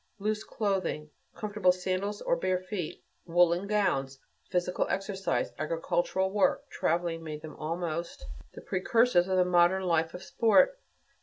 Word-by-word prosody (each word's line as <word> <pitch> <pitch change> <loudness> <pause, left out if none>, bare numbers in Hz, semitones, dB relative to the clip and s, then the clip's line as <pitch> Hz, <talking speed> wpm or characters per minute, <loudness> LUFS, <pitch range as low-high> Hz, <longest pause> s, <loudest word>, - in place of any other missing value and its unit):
Loose 215 +1 -2
clothing, 190 -7 -2 0.2
comfortable 205 -3 +2
sandals, 185 +3 -3
or - - +2
bare 185 +2 0
feet, 185 -2 -5 0.2
woolen 175 +2 +3
gowns, 135 -11 0 0.3
physical 180 0 0
exercise, 195 -1 -1
agricultural 170 +4 0
work, 205 -1 +1
traveling, 170 0 -1
made 155 -1 -7
them 155 - -8
almost 170 - -4 0.3
the - - -8
precursors 190 0 +2
of 190 -1 +1
the 180 - +4
modern 180 +1 +3
life 165 -2 +1
of 180 - -8
sport. 245 - +4
180 Hz, 135 wpm, -29 LUFS, 170-195 Hz, 0.3 s, the